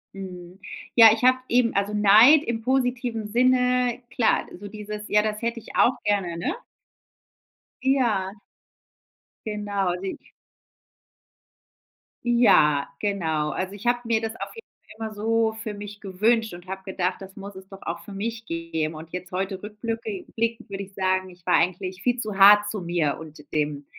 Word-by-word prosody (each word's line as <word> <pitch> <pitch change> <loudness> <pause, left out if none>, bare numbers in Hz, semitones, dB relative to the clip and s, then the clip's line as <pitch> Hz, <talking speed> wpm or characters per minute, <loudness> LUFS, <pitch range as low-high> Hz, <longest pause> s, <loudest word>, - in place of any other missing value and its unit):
Mhm. 180 -1 -9 0.4
Ja, 225 -2 +10
ich 225 +2 -4
habe 255 0 +5
eben 240 -1 +2
also 200 +1 0
Neid 215 +8 +7
im 235 -5 -3
positiven 245 -3 -1
Sinne, 250 +1 +2
klar, 240 -2 +1 0.2
so 205 - -7
dieses, 210 0 -7
ja, 210 0 +4
das 215 0 -3
hätte 235 0 -2
ich - - -13
auch 240 - +5
gerne, 190 -5 0
ne? 170 - -2 1.3
Ja. 235 -8 +1 1.2
Genau, 205 -3 -1
seh 195 - -3
ich - - -25 1.9
Ja, 200 -12 +4
genau. 160 -7 -1
Also 185 +1 -3
ich 205 +3 -11
hab 240 0 +1
mir 225 -1 +1
das 225 0 -4
auf - - -6
jeden 455 - -12 0.3
Fall 225 0 -4
immer 215 - -9
so 225 +1 +1
für 215 - -5
mich 205 0 -9
gewünscht 220 +3 +1
und 175 +1 -11
hab 190 0 -6
gedacht, 185 -1 -2
das 190 0 -11
muss 200 0 -9
es 190 0 -11
doch 195 0 -12
auch 170 0 -4
für 200 - -10
mich 225 +3 -4
geben. 165 -3 -3
Und 160 +1 -10
jetzt 180 +1 -7
heute 190 +1 -3
rückblücki 215 -1 -5
blickend 230 0 -2
würd 195 0 -5
ich 195 0 -10
sagen, 185 0 0
ich 180 -1 -18
war - - +3
eigentlich 185 +2 0
viel 245 +2 0
zu 215 -4 -4
hart 205 +1 +7
zu 210 -2 -4
mir 170 -4 0
und 155 -2 -11
dem 150 -1 -1
205 Hz, 170 wpm, -24 LUFS, 185-230 Hz, 1.9 s, Ja